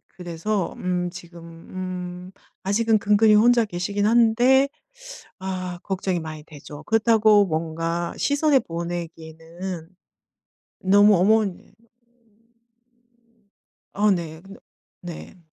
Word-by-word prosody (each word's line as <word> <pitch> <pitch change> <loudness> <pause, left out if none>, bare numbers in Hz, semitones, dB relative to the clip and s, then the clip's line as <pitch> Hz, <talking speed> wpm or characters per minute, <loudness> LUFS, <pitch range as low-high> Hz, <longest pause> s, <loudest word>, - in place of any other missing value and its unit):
그래서 180 +2 -3
음 180 -1 -2
지금 175 -1 -12
음 180 +1 -7 0.3
아직은 215 +3 +1
근근이 210 +1 +4
혼자 235 +2 +5
계시긴 200 +2 -2
한데 240 +4 +4 0.7
아 185 -2 -5
걱정이 190 -2 -2
많이 155 -2 -8
되죠. 145 -1 -12
그렇다고 220 -2 +4
뭔가 165 +1 -3
시설에 285 -1 +2
보내기에는 170 -1 -7 1.0
너무 205 +2 +6
어머니 200 +1 +1 2.2
아 210 +1 +3
네 165 -4 -2
근데 195 +2 -14 0.4
네. 175 +1 -10
185 Hz, 200 characters per minute, -23 LUFS, 170-210 Hz, 2.2 s, 너무